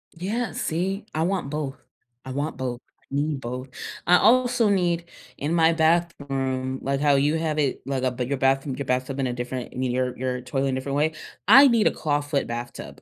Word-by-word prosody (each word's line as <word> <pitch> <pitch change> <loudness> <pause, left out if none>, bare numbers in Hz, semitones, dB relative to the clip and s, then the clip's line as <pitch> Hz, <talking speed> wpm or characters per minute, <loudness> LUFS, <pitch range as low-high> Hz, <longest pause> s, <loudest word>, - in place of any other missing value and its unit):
Yeah, 215 +8 -2
see. 190 +6 -2
I 160 +1 0
want 180 -6 -1
both. 150 -2 -3 0.5
I 130 - -6
want 145 +2 -3
both. 125 -2 -3 0.2
I - - -32
need 145 0 -1
both. 125 +2 -5 0.4
I 180 +1 +6
also 245 -2 +4
need, 175 -3 +1 0.3
in 150 +4 -2
my 165 -1 +4
bathroom, 135 -6 0
like 140 0 -1
how 145 -1 +4
you 145 +3 +2
have 155 -1 -1
it, 140 -3 0
like, 135 -1 -2
uh, 130 - +2
but, 125 0 -3
your 140 - -1
bathroom 135 0 +1
your 140 - -4
bathtub 130 +2 -1
in 130 - +1
a 125 - -2
different 125 0 -4
I - - -9
mean, 130 -1 0
your 125 0 -1
your 125 0 -2
toilet 135 +2 -1
in 130 - -1
a - - -1
different 140 +1 -4
way. 155 +2 +2 0.3
I 275 +1 +9
need 230 -4 +4
a - - +3
clawfoot 145 -1 -1
bathtub. 120 +1 -7
140 Hz, 210 wpm, -24 LUFS, 130-165 Hz, 0.5 s, I